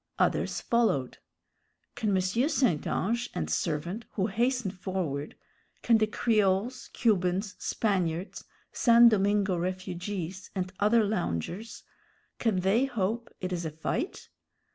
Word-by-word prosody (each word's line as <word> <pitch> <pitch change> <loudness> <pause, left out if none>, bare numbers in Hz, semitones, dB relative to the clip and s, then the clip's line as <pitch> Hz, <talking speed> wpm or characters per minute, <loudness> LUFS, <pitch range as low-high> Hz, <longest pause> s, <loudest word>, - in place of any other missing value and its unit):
Others - - +1
followed. 225 - +1 0.7
Can 215 - -2
M. 190 -2 +3
St. 235 - +1
Ange 235 +4 -1
and 80 -1 -2
servant, 155 - -2
who 190 - 0
hasten 235 0 0
forward 180 -7 -4 0.5
can 230 -2 +4
the 215 - +3
Creoles, 215 +2 +1
Cubans, 195 -2 +1
Spaniards, 185 -4 -1 0.3
San 235 0 +6
Domingo 200 -2 +2
refugees, 185 +1 -4
and 185 0 -3
other 215 +2 +4
loungers 200 - -3 0.6
can 210 -6 +1
they 205 +8 +3
hope 230 -2 -2
it 185 0 -2
is 175 -1 -2
a 160 - -2
fight? 160 - -4
195 Hz, 120 wpm, -29 LUFS, 180-230 Hz, 0.7 s, San